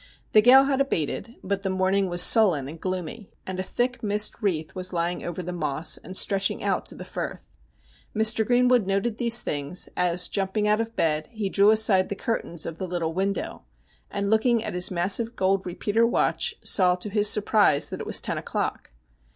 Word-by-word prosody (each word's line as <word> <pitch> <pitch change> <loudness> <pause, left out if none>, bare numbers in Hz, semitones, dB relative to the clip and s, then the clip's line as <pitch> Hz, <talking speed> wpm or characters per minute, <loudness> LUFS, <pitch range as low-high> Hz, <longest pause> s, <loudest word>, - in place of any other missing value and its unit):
The 215 - +5
gale 255 +4 +7
had 275 0 0
abated, 230 - -3
but 195 +1 -3
the 195 - -3
morning 190 +1 0
was 175 0 +6
sullen 180 - +5
and 160 +3 -11
gloomy, 185 +3 -5 0.2
and 185 0 -6
a - - 0
thick 245 +5 -3
mist 210 +2 0
wreath 165 -7 -2
was 185 -1 -3
lying 175 +1 -2
over 175 +1 -5
the 180 +1 -6
Moss, 155 -2 -2
and 185 +3 -7
stretching 195 -1 0
out - - -2
to - - -5
the - - -10
Firth. - - -7 0.7
Mr. 220 +1 +4
Greenwood 245 -2 +2
noted 200 +3 -2
these 235 0 +4
things, 145 +4 -2
as 180 -1 +1
jumping 200 +2 -2
out 210 +1 +2
of 225 0 -7
bed 155 -1 -1
he 215 -4 -4
drew 200 +2 +3
aside 215 -4 +3
the 200 - -4
curtains 195 -6 -3
of 165 -1 -7
the 185 - -4
little 170 -2 -3
window, 195 +3 -3 0.5
and 200 0 -3
looking 225 +1 +2
at - - -5
his 180 0 +1
massive 195 +6 +1
gold 190 0 0
repeater 205 +6 0
watch 235 - 0
saw, 180 -2 +3
to 180 +3 -6
his 210 0 +4
surprise, 210 -8 +2
that - - -6
it - - -7
was - - +4
ten - - -3
o'clock. - - -4
195 Hz, 195 wpm, -24 LUFS, 180-220 Hz, 0.7 s, gale